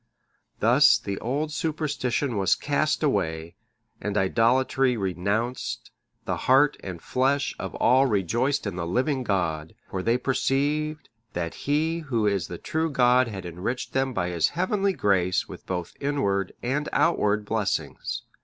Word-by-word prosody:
Thus - - +6
the 100 -1 -5
old 145 +6 -2
superstition 145 -5 -1
was 95 -2 +3
cast - - 0
away, 80 +1 -1 0.5
and 105 0 -2
idolatry 125 +5 +2
renounced, 100 +6 -2 0.3
the - - -1
heart 135 +2 +5
and 90 -3 -6
flesh 135 +6 0
of - - -5
all 130 +3 +4
rejoiced 120 - 0
in 100 -3 -4
the 85 -1 -3
living 130 - 0
God, 80 -7 -1 0.2
for 95 - -2
they 115 +5 +2
perceived 145 +4 -1 0.2
that 85 -1 -3 0.2
He 160 +3 +1
Who 125 -9 -1
is 100 -5 +1
the 85 - -6
true 160 - -1
God 125 -2 +4
had 95 -5 -6
enriched 90 +9 -4
them 135 0 +1
by 90 -7 -1
His 85 -3 +1
heavenly 195 +2 +1
grace 95 - +1
with - - -11
both 90 -2 -3
inward 100 -10 0
and 140 +5 -1
outward 105 -10 +2
blessings. 105 -2 -2
120 Hz, 145 wpm, -26 LUFS, 95-140 Hz, 0.5 s, Thus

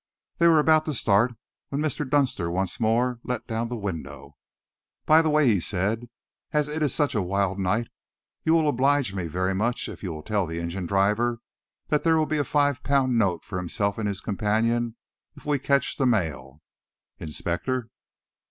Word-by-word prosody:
They 170 - +5
were 165 -1 +6
about 155 +1 +4
to 155 - -2
start 115 +3 +2 0.3
when 140 - -2
Mr. 150 -2 -2
Dunster 130 -12 +1
once 90 +1 -2
more 120 +2 +1
let 125 - -3
down 115 0 -2
the 120 - -4
window. 75 -8 -6 0.7
"By 155 +1 +6
the 160 - +1
way," 150 -1 +3
he 110 -6 +4
said, 105 +7 -2 0.4
"as 150 -1 +1
it 150 +1 -4
is 150 -4 +2
such 145 +1 0
a 105 - +1
wild 100 +1 -1
night, 105 +5 0 0.6
you 160 - +3
will 160 -2 +3
oblige 140 -4 +2
me 90 -3 -3
very 95 +4 -1
much 115 +5 -1
if - - -9
you 95 - -4
will 75 -1 -7
tell 105 -2 0
the 80 +1 -4
engine 85 +2 -4
driver 105 +5 +1 0.5
that 150 - +1
there 165 -1 +4
will 155 - +2
be 155 0 -1
a - - +2
five 145 -2 +1
pound 130 -4 +2
note 90 -6 0
for 95 -3 -4
himself 100 +4 -2
and 105 - -1
his 100 -2 -2
companion 115 +3 0 0.4
if - - -15
we 145 -1 +1
catch 140 0 +1
the 135 - +2
mail. 75 - -1 0.6
Inspector!" 90 - -3
115 Hz, 190 wpm, -25 LUFS, 95-140 Hz, 0.7 s, were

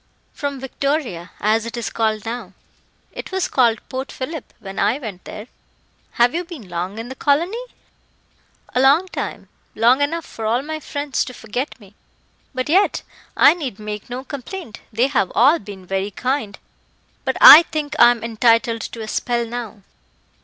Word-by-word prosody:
"From 280 -2 -4
Victoria, 265 - -2
as 215 +2 +2
it 235 - -6
is 235 - -3
called 220 -1 -1
now. 225 -4 -5 0.6
It - - -8
was 380 -1 0
called 235 -4 +2
Port 260 +1 -5
Phillip 295 +2 -6
when 195 -1 -7
I 250 - +2
went 215 -10 -8
there." 210 - -8 0.7
"Have 240 +1 +3
you 345 +2 -1
been 330 - -10
long 180 +4 -4
in 225 +1 -5
the 260 - -6
colony?" 335 - 0 1.1
"A - - +1
long 285 +8 +5
time - - -5 0.3
long 240 +5 +4
enough 325 +3 -1
for 220 -1 -5
all 240 +4 +1
my 310 +1 -5
friends 285 -2 -2
to 255 - -9
forget 250 +5 -5
me. 200 -2 -17 0.6
But 255 0 -3
yet 375 +7 +2 0.3
I - - +7
need 280 - -5
make 210 +1 -7
no 250 +2 -5
complaint; 280 - -8
they 235 +3 +2
have 255 -9 0
all 285 +8 +5
been 200 -2 -10
very 195 +2 -2
kind; 250 -1 -2 0.7
but - - -1
I 310 - +12
think 300 -1 -3
I 240 - +9
am 240 -2 -1
entitled 230 0 +2
to 230 - -6
a 220 - -6
spell 235 +2 -1
now." 225 -3 -7
245 Hz, 170 wpm, -20 LUFS, 215-285 Hz, 1.1 s, I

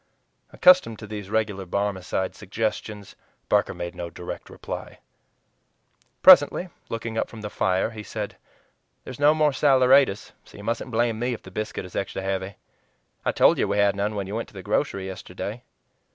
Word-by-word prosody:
Accustomed 180 -12 +5
to 110 - -9
these 105 -2 -7
regular 105 -3 -1
Barmecide 95 0 -2
suggestions, 105 0 -4 0.3
Barker - - +2
made 85 0 -5
no 85 -1 -6
direct 90 +1 -8
reply. - - -7 1.3
Presently, 180 0 +7 0.2
looking 115 0 -3
up - - -1
from 110 - -10
the 105 -1 -6
fire, 95 +4 0
he 110 -2 -8
said, 105 -1 -5 0.7
"There's 130 - -9
no 150 +1 +5
more 155 -1 +3
saleratus, 130 -5 +4
so - - -16
you 100 - -10
mustn't 115 +3 -2
blame 115 -1 0
me 120 +1 -1
if - - -14
the 95 - -12
biscuit 105 -1 -4
is 90 - -12
extra 95 0 -3
heavy. 95 0 -3 0.7
I - - +1
told - - +4
you - - +2
we 100 - -1
had 100 0 +3
none 105 +2 -1
when 100 -1 -2
you 100 - -7
went 115 +1 -3
to - - -20
the 95 - -8
grocery 105 -2 -1
yesterday." 95 +4 -6
105 Hz, 175 wpm, -25 LUFS, 95-115 Hz, 1.3 s, Presently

